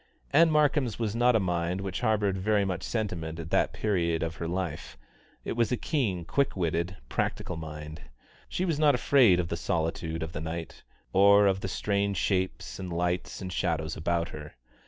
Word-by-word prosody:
Ann 165 +3 +6
Markham's 145 -6 +2
was 110 -2 -2
not 120 +1 +4
a - - +5
mind 90 -1 -1
which 95 0 -4
harboured 105 -4 +1
very 100 +1 +1
much 90 -2 -2
sentiment 85 -8 -3
at 80 0 -7
that - - +2
period 85 -6 0
of 80 0 -4
her 85 - -3
life; 85 -8 -4 0.5
it - - -3
was 115 0 +1
a 125 - +1
keen, 105 - -1
quick 135 +6 0
witted, 85 +1 -1
practical 90 - -2
mind. 75 -1 -7 0.5
She 185 - -1
was 165 -5 0
not 150 -3 +5
afraid 125 -8 +5
of 85 -2 -1
the - - -1
solitude 80 0 -2
of 80 - -5
the 75 - -5
night, 80 +1 -6 0.3
or 100 +1 +6
of 95 -1 +2
the 95 - -3
strange 100 +1 -1
shapes 90 -10 -1
and 90 -2 -5
lights 90 +3 -2
and 90 -1 -5
shadows 80 -3 -1
about 85 +1 -1
her. 75 -1 -9
95 Hz, 185 wpm, -28 LUFS, 85-110 Hz, 0.5 s, Ann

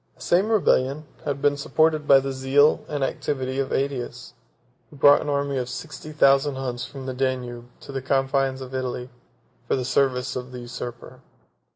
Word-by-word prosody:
The - - -22
same 185 +5 +2
rebellion 155 -9 +2 0.2
had 140 -1 -3
been 145 0 +4
supported 155 +1 +1
by 135 -1 +8
the 135 0 -3
zeal 135 +3 +3
and 145 -2 -2
activity 130 -1 -2
of 135 -1 -1
Ætius, 125 -3 -3 0.6
who - - -15
brought 145 +1 +6
an - - -4
army 140 -1 0
of 125 0 -4
sixty 155 +2 -7
thousand 140 -1 +4
Huns 125 -2 -4
from 135 +1 -8
the 130 - -3
Danube 125 -2 -3
to - - -10
the 135 -1 -3
confines 135 0 0
of 130 0 -8
Italy, 125 -1 -4 0.6
for - - +2
the 130 -2 -2
service 130 -1 +1
of 125 0 -5
the 125 -1 -7
usurper. 120 0 -8
135 Hz, 180 wpm, -24 LUFS, 130-145 Hz, 0.6 s, by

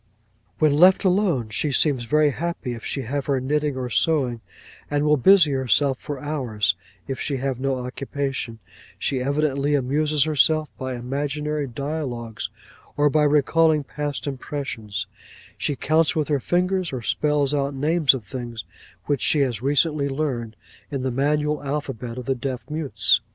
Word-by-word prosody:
'"When 155 -2 +3
left 180 +5 +6
alone, 180 - +2
she 140 +7 0
seems 135 -2 +2
very 150 +4 +3
happy 165 -5 -3
if 115 - -8
she 135 - -3
have 140 +3 -3
her 140 -2 +2
knitting 145 +1 0
or 125 -1 -4
sewing, 130 -8 +1 0.5
and 145 0 +1
will 150 0 +5
busy 165 +2 +6
herself 135 0 +2
for 145 -2 -5
hours; 125 - 0 0.3
if 135 -1 -4
she 140 -2 -2
have 130 -1 -2
no 135 0 0
occupation, 135 -2 -4 0.4
she 130 -2 -1
evidently 140 +1 +1
amuses 145 +2 +1
herself 155 0 +2
by 130 -1 -4
imaginary 145 +4 -2
dialogues, 125 -3 -4 0.5
or 145 0 +4
by 155 - +3
recalling 150 +1 +3
past 145 -3 -4
impressions; 125 -6 -4 0.5
she 145 - -2
counts 155 +5 +2
with 155 -2 0
her 145 -2 +2
fingers, 180 +4 0
or 130 -3 -4
spells 150 0 +1
out 140 -1 0
names 150 +1 +3
of 125 - -6
things 120 -1 -6 0.4
which 145 -3 0
she 150 - +3
has 120 -6 0
recently 145 +1 +2
learned, 130 -6 -2 0.3
in 140 -3 -3
the 130 - 0
manual 150 +3 +1
alphabet 135 -5 -4
of 125 - -6
the 135 - +1
deaf 130 0 -5
mutes. 115 -7 +2
140 Hz, 155 wpm, -23 LUFS, 125-150 Hz, 0.5 s, left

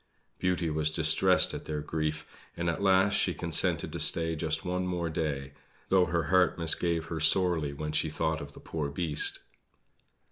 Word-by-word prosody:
Beauty 90 -3 -1
was 75 0 +1
distressed 80 - +2
at - - -7
their 75 -1 -4
grief, 75 0 -4 0.3
and 85 0 -1
at 85 - -6
last 95 +1 +3
she 95 -3 +1
consented 85 -3 0
to - - -5
stay 80 0 0
just 80 -1 -3
one 90 +1 -2
more 85 -2 -3
day; 70 -4 -4 0.4
though 95 -1 +4
her 85 -1 -1
heart 90 +2 +2
misgave 85 0 +4
her 80 - -5
sorely 80 -2 +3
when 75 +2 -5
she 80 +1 0
thought 80 +1 -2
of 70 0 -10
the - - -13
poor 75 -3 -5
Beast. 75 0 -1
80 Hz, 175 wpm, -28 LUFS, 75-90 Hz, 0.4 s, though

